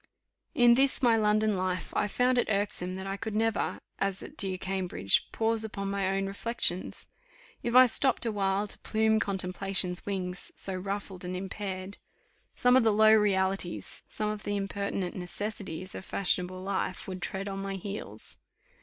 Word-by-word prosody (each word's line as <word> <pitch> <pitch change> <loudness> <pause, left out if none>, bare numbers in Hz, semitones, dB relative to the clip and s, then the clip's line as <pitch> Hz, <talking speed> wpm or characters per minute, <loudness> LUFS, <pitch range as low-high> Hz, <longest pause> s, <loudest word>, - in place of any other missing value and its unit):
In 240 -1 +7
this 270 +2 +3
my 235 -2 +6
London 215 -1 +2
life, 185 -1 -2
I 210 - +2
found 250 +4 +2
it - - 0
irksome 200 -3 0
that 190 0 -5
I 195 0 -3
could 220 +1 -4
never, 225 0 0 0.2
as 195 -1 -1
at - - -10
dear 190 -2 -1
Cambridge, 185 - 0
pause 225 0 +2
upon 200 -2 -4
my 200 -1 0
own 195 - 0
reflections. 195 -2 -2 0.6
If 240 0 -2
I 255 0 +10
stopped 250 +1 +1
awhile, 200 -2 0
"to - - -8
plume 220 0 +2
contemplation's 190 -1 0
wings, 185 -2 -3
so 195 - +1
ruffled 195 0 -4
and 180 +1 -4
impaired," 190 0 -5 0.6
some 250 0 +4
of 260 - +6
the 220 - +4
low 215 +1 +6
realities, 195 -4 +1
some 215 -1 -2
of 215 -1 -5
the 205 0 -2
impertinent 195 -2 -2
necessities 185 -1 -5
of - - -7
fashionable 185 -1 +1
life, 190 -1 -2
would 185 -1 -6
tread 195 +2 -3
on 195 -1 -4
my 195 0 -3
heels. 200 +2 -4
195 Hz, 165 wpm, -29 LUFS, 185-215 Hz, 0.6 s, I